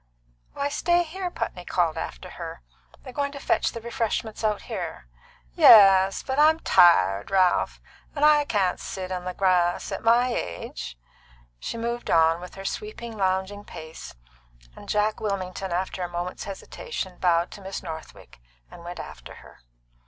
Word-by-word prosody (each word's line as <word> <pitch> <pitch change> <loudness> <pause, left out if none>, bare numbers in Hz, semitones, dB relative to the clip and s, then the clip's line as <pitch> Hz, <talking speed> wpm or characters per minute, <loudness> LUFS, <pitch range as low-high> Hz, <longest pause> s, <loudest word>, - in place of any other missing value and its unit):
"Why, 280 - -1
stay 345 +4 +2
here!" 360 +3 -5
Putney 180 - -5
called 170 -3 0
after 60 - -6
her. - - -8 0.4
"They're 255 - -10
going 280 0 -1
to 280 - -7
fetch - - +1
the 230 - -7
refreshments 230 -2 -3
out 210 -1 0
here." 60 - -6 0.5
"Yes, 195 - +7
but 265 +1 -2
I'm 315 +2 +5
tired, 100 - +5
Ralph, 185 -2 +2 0.4
and 290 0 +3
I 300 -1 +5
can't 195 -8 0
sit 185 -1 -6
on 180 -1 -4
the 180 0 -4
grass, 180 -2 +1
at - - -4
my 240 +2 +4
age." 85 - -5 0.6
She 230 - -5
moved 235 +1 -3
on, 165 +1 +4
with 180 - -10
her 195 0 -9
sweeping, 235 - -5
lounging 190 +1 -1
pace, 160 -5 -10 0.6
and - - -12
Jack 210 +1 +1
Wilmington, 190 -2 -3
after 185 +1 -2
a 175 - -2
moment's 175 +1 -5
hesitation, 195 - -6
bowed 170 -1 +2
to 205 - -10
Miss 195 0 -6
Northwick 160 - -9 0.3
and 170 - -12
went 175 +1 -7
after - - -9
her. - - -16
195 Hz, 160 wpm, -25 LUFS, 175-235 Hz, 0.6 s, Yes